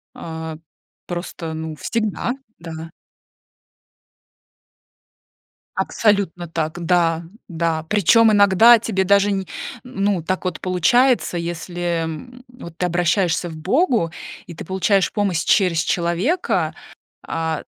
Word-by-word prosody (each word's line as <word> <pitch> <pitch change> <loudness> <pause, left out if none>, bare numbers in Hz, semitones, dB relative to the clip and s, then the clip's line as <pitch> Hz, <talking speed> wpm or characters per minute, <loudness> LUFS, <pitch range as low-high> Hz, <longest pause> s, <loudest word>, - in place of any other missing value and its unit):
а, 160 -1 -6 0.5
просто, 175 -2 -5
ну, 160 0 -5
всегда, 220 +5 -2 0.3
да. 165 -1 -8 2.9
Абсолютно 200 -5 0
так, 165 +1 -3
да, 165 -1 +2 0.3
да. 165 -2 -1
Причём 215 +4 +4
иногда 205 +4 +7
тебе 200 -4 -1
даже 200 +1 +4
не, 195 -1 -1 0.4
н 250 - -13
ну 195 -5 +1
так 185 +3 -2
вот 180 -3 -3
получается, 190 +5 +2
если, 175 0 -3
м, 245 +11 -8
вот 170 -9 -12
ты 180 - +1
обращаешься 175 0 +1
к 160 - -8
Богу 225 - +1 0.4
и 170 - -9
ты - - -8
получаешь 190 +2 +1
помощь 195 -7 0
через 180 -5 +3
человека, 180 - 0 0.5
а, 160 -1 -2
175 Hz, 110 wpm, -21 LUFS, 165-205 Hz, 2.9 s, иногда